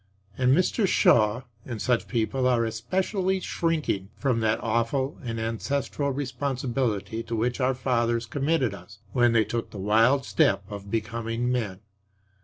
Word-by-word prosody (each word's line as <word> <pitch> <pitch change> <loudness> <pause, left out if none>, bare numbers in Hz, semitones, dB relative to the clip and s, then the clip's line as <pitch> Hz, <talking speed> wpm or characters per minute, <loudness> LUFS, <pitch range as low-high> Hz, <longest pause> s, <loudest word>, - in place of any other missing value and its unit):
And 130 +4 +3
Mr. 190 +3 +2
Shaw 110 - +4 0.2
and 120 -3 -6
such 125 +1 +1
people 125 +2 0
are 120 -2 +3
especially 185 - -1
shrinking 155 - -1
from 125 +1 +1
that 110 0 +2
awful 115 +5 0
and 115 -2 -3
ancestral 140 +5 -2
responsibility 125 -5 -2
to 115 0 -4
which 120 +4 -1
our 130 +1 +2
fathers 120 -2 0
committed 135 -1 0
us 105 +1 -12 0.2
when 120 -2 +4
they 110 -2 +4
took 115 -1 -3
the - - -10
wild 115 +7 +3
step 100 0 +2
of 100 -1 -8
becoming 115 +2 -2
men. 105 -7 -2
120 Hz, 145 wpm, -26 LUFS, 110-135 Hz, 0.2 s, Shaw